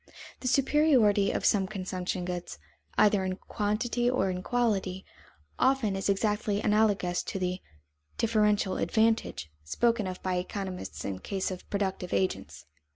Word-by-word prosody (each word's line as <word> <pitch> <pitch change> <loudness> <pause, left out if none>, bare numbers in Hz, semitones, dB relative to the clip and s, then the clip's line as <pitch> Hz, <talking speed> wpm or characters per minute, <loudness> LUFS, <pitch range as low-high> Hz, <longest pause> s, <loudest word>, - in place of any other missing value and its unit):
The 255 - -4
superiority 255 -7 +4
of - - -2
some 195 -3 +3
consumption 185 -2 -3
goods, 180 - -5 0.4
either 205 -2 +4
in 185 0 -2
quantity 230 +5 -1
or 195 -7 +1
quality, 195 -5 0 0.5
often 255 -7 +2
is 195 +1 -2
exactly 205 +1 +1
analogous 205 -4 +2
to - - -5
the 185 0 -2 0.6
"differential 210 -4 +2
advantage" 220 - +1
spoken 230 - +1
of 185 -1 -5
by 185 -1 0
economists 185 - -5
in 95 -1 -3
the - - -15
case 195 -1 -2
of 185 - -8
productive 190 -3 -2
agents. 185 - -2
200 Hz, 135 wpm, -29 LUFS, 185-220 Hz, 0.6 s, superiority